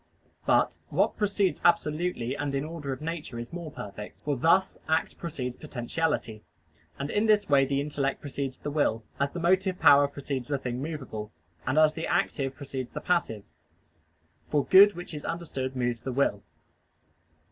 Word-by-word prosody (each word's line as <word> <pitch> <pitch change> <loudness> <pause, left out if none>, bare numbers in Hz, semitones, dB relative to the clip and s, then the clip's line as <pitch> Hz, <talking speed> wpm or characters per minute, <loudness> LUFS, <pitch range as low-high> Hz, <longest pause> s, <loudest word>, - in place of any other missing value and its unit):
But - - +3
what - - +2
precedes 200 -2 +1
absolutely 155 -6 +1
and 145 -1 -2
in 135 - 0
the 155 - -6
order 155 -5 -5
of 130 - -5
nature 160 -6 -4
is 120 +6 -7
more 170 -2 -5
perfect: 105 -5 -8
for 145 0 -1
thus 170 +8 +3
act 160 +1 +1
precedes 130 -7 -4
potentiality. 135 -4 -2 0.6
And 140 +1 -3
in 210 +2 +2
this 210 -1 +4
way 140 -1 +5
the 140 +1 0
intellect 140 -1 -1
precedes 140 -2 -4
the 145 - -5
will, 130 -7 +1 0.2
as 140 0 +2
the 175 - -6
motive 185 +2 +2
power 145 -2 +7
precedes 140 -3 -5
the 145 - 0
thing 125 -1 -4
movable, 130 -9 -5 0.4
and 130 +4 +1
as 155 0 +6
the 165 - -4
active 135 -2 0
precedes 130 -2 -5
the - - -3
passive; 140 - 0 1.1
for 145 -2 +1
good 200 +2 +8
which 175 -1 -7
is 150 - -6
understood 135 -6 -4
moves 120 -2 -1
the 130 - -4
will. 120 -6 +1
145 Hz, 170 wpm, -28 LUFS, 130-165 Hz, 1.1 s, good